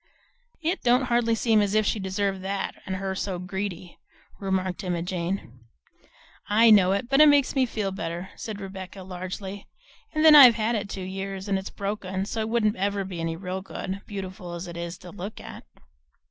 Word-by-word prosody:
"It 340 +5 0
don't 245 +2 +4
hardly 230 -1 +3
seem 220 -1 +3
as 205 0 0
if 215 0 +3
she 215 - 0
deserved 195 0 -1
that, 195 +1 -3
and 190 - -2
her 190 0 -3
so 190 -1 -3
greedy," 180 -1 -5 0.4
remarked 190 -1 -1
Emma 175 -2 -1
Jane. 180 -4 -3 1.0
"I 225 +2 +6
know 190 -3 +6
it, 200 +5 -1
but 275 +3 +4
it 305 - +9
makes 285 -2 +4
me 265 -2 +2
feel 210 -4 -2
better," 175 0 -5
said 215 -2 -6
Rebecca 190 -1 -8
largely; 190 +2 -6 0.4
"and 310 0 +1
then 315 - +10
I've 260 -6 +10
had 225 +1 0
it 205 -3 -2
two 190 - -5
years, 195 +1 -5
and 195 -1 +1
it's 190 - -7
broken 195 -2 -3
so 225 - -4
it 220 - -2
wouldn't 220 -2 +1
ever 200 +1 0
be 185 -3 -6
any 165 0 -2
real 185 +2 -4
good, 195 0 -6
beautiful 190 -3 -6
as 170 +1 -6
it 170 - -8
is 170 0 -5
to 180 - -12
look 205 +2 -7
at." - - -10
195 Hz, 195 wpm, -26 LUFS, 185-215 Hz, 1.0 s, then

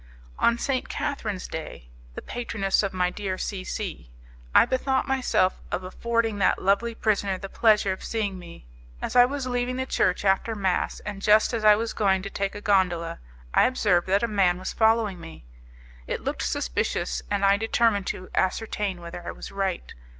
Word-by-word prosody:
On 235 - +3
St. 260 +1 -2
Catherine's 225 -10 -3
Day, - - -8 0.2
the - - -7
patroness 225 -5 -1
of 200 -2 -2
my 180 -1 0
dear 195 -2 -4
C 190 -1 -4
C, 185 - -5 0.5
I - - +8
bethought 260 +1 0
myself 255 -8 +1
of 185 - -2
affording 225 +3 -1
that 190 - +3
lovely 215 +4 +1
prisoner 200 -4 0
the 195 - -7
pleasure 210 -3 +3
of 190 - -5
seeing 205 -4 -2
me. 170 - -12 0.3
As - - -4
I 245 0 +8
was 275 +1 -3
leaving 245 0 -1
the 260 0 -2
church 230 - 0
after 195 +4 +2
mass, 190 -3 -1
and 205 -1 -6
just 215 +3 +4
as 225 -2 -2
I 210 -1 +8
was 225 +1 -3
going 190 -3 +1
to 200 - -6
take 195 +1 -2
a 205 - -6
gondola, 185 -5 +1 0.3
I - - +5
observed 200 -9 +1
that 195 +4 +2
a - - +2
man 195 -5 +2
was 185 - -5
following 220 -5 +2
me. 165 - -11 0.6
It - - -3
looked - - -3
suspicious, - - -1
and 200 - +1
I 200 0 +5
determined 225 -2 +1
to 185 - -5
ascertain 195 -1 -1
whether 170 +1 -8
I - - -6
was - - -8
right. 195 -2 -3
200 Hz, 185 wpm, -25 LUFS, 185-225 Hz, 0.6 s, I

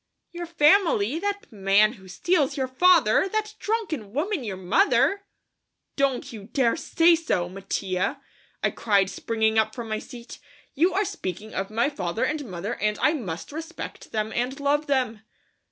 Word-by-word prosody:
"Your 345 0 -6
family! 320 - +3
That 405 -1 -3
man 205 +1 +3
who 190 -6 -15
steals, 295 - 0
your 265 -1 0
father! 335 - +4
That 430 +1 -2
drunken 335 - -3
woman 325 - -1
your 200 -5 -4
mother!" 395 - +2 0.7
"Don't 275 -4 0
you 210 -3 -9
dare 240 +1 +1
say 330 +1 +3
so, 310 - -1
Mattia," 190 0 -2 0.4
I - - +2
cried, 200 -3 +1
springing 220 +2 +1
up 220 0 0
from 235 -3 -6
my 215 0 -1
seat; 240 -2 -11 0.3
"you 340 +6 +3
are 405 +2 +2
speaking 220 - -6
of 195 0 -3
my 225 +4 +1
father 195 - -3
and 300 -1 -1
mother 185 +5 -4
and 210 -1 -1
I 305 - +3
must 190 - -5
respect 325 +3 -8
them 215 0 -2
and 255 +4 -2
love 290 +2 +1
them." 250 -6 0
250 Hz, 160 wpm, -25 LUFS, 210-330 Hz, 0.7 s, father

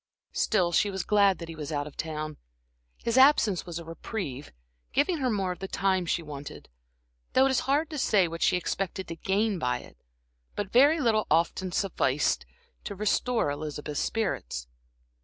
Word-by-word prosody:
Still, 185 -6 +2
she 205 +4 +3
was 190 -2 -3
glad 200 -1 +4
that 170 - -7
he 165 - -7
was 155 0 -6
out 145 -1 -1
of 150 - -10
town. 155 -1 -4 0.7
His 235 +2 +2
absence 245 - +5
was 170 -1 -5
a 170 - -7
reprieve, 165 - -5 0.4
giving 305 +4 +2
her 260 -2 +1
more 195 -5 0
of 180 - -6
the 190 - -4
time 190 -2 0
she 170 - 0
wanted, 145 -2 -9 0.6
though 260 - +5
it 270 - +3
is 260 - +2
hard 295 +4 +3
to 300 - -3
say 195 -7 +3
what 165 0 -7
she - - +4
expected 190 +1 -3
to 165 - -4
gain 200 +3 0
by 125 -4 0
it. - - -16 0.6
But 205 -1 -3
very 285 +6 +6
little 225 -5 +2
often 170 +3 +1
sufficed 150 -8 0 0.4
to 200 - -4
restore 215 -2 +1
Elizabeth's 150 0 -4
spirits. 180 - -2
190 Hz, 175 wpm, -28 LUFS, 160-220 Hz, 0.7 s, very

